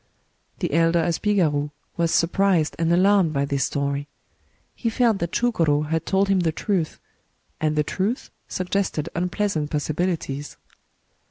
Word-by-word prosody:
The -, -, -2 dB
elder 165 Hz, +1 st, +3 dB
asbigaru 165 Hz, -5 st, +1 dB, 0.3 s
was 170 Hz, -1 st, +1 dB
surprised 175 Hz, -1 st, +2 dB
and 165 Hz, 0 st, +2 dB
alarmed 185 Hz, -2 st, +4 dB
by 140 Hz, -1 st, +1 dB
this 140 Hz, -2 st, 0 dB
story. 140 Hz, 0 st, -2 dB, 0.7 s
He 230 Hz, -, -2 dB
felt 225 Hz, -3 st, +2 dB
that 170 Hz, 0 st, -2 dB
ChugoyS 155 Hz, -11 st, +1 dB
had 160 Hz, 0 st, -1 dB
told 195 Hz, +1 st, +2 dB
him 195 Hz, -1 st, +3 dB
the 170 Hz, -2 st, +1 dB
truth; 170 Hz, -1 st, -2 dB, 0.6 s
and 155 Hz, -1 st, 0 dB
the 150 Hz, -, +2 dB
truth 195 Hz, -, -2 dB, 0.2 s
suggested 185 Hz, -4 st, -2 dB
unpleas 180 Hz, +3 st, -1 dB
ant 150 Hz, -1 st, -1 dB
possibilities. 150 Hz, -2 st, -2 dB
170 Hz, 140 wpm, -23 LUFS, 150-195 Hz, 0.7 s, alarmed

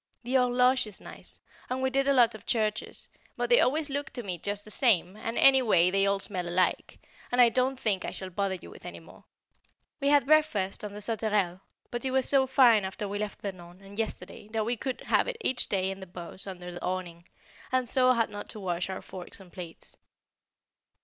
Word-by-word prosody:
The 245 Hz, +2 st, -4 dB
Horloge 250 Hz, -1 st, +3 dB
is 210 Hz, -, -7 dB
nice, -, -, -12 dB, 0.3 s
and 255 Hz, +1 st, -2 dB
we 260 Hz, 0 st, 0 dB
did 275 Hz, +1 st, +1 dB
a 280 Hz, -, +4 dB
lot 240 Hz, -3 st, +5 dB
of 215 Hz, -, -12 dB
churches, 215 Hz, -2 st, -1 dB, 0.3 s
but -, -, -2 dB
they 485 Hz, -, +7 dB
always 300 Hz, +3 st, +2 dB
look 285 Hz, +2 st, -3 dB
to 245 Hz, -1 st, -4 dB
me 180 Hz, -4 st, -4 dB
just 205 Hz, +3 st, -3 dB
the 215 Hz, -, -8 dB
same, 200 Hz, -8 st, +2 dB
and 230 Hz, +2 st, -5 dB
any 265 Hz, -1 st, +7 dB
way 180 Hz, -7 st, +4 dB
they 195 Hz, +1 st, +3 dB
all 200 Hz, 0 st, +1 dB
smell 185 Hz, -3 st, -3 dB
alike, 180 Hz, +1 st, 0 dB, 0.3 s
and 245 Hz, -, 0 dB
I 240 Hz, -1 st, +8 dB
don't 255 Hz, +2 st, 0 dB
think 200 Hz, -6 st, 0 dB
I -, -, -3 dB
shall 190 Hz, -1 st, -6 dB
bother 195 Hz, +1 st, -1 dB
with -, -, -13 dB
any -, -, -8 dB
more. -, -, -17 dB, 0.7 s
We 280 Hz, -, 0 dB
had 285 Hz, -2 st, +5 dB
breakfast 280 Hz, -12 st, +2 dB
on 210 Hz, -, -5 dB
the 210 Hz, -, -8 dB
Sauterelle, 210 Hz, -4 st, 0 dB, 0.3 s
but 240 Hz, -1 st, -3 dB
it 265 Hz, -, 0 dB
was 265 Hz, 0 st, +1 dB
so 270 Hz, -2 st, +4 dB
fine 245 Hz, -6 st, +5 dB
after 190 Hz, +2 st, -4 dB
we 205 Hz, +1 st, -4 dB
left 210 Hz, -1 st, -5 dB
Vernon, 180 Hz, -2 st, -7 dB
and 200 Hz, +2 st, -10 dB
yesterday, 205 Hz, -2 st, -5 dB
that 220 Hz, -1 st, 0 dB
we 240 Hz, +2 st, 0 dB
could 255 Hz, +2 st, -4 dB
have -, -, +2 dB
it -, -, -3 dB
each 260 Hz, -, +1 dB
day 190 Hz, -1 st, 0 dB
in 195 Hz, -, -7 dB
the 190 Hz, -, -9 dB
bows 175 Hz, +2 st, -7 dB
under 180 Hz, -2 st, -7 dB
the 175 Hz, -, -8 dB
awning, 180 Hz, -2 st, -4 dB, 0.4 s
and 255 Hz, -1 st, +1 dB
so 255 Hz, +1 st, +4 dB
had 230 Hz, -2 st, 0 dB
not 205 Hz, 0 st, -7 dB
to 215 Hz, -, -9 dB
wash 180 Hz, -2 st, -2 dB
our 190 Hz, -, -5 dB
forks 185 Hz, +1 st, -9 dB
and 185 Hz, -3 st, -15 dB
plates. 175 Hz, -3 st, -10 dB
210 Hz, 220 wpm, -28 LUFS, 190-255 Hz, 0.7 s, I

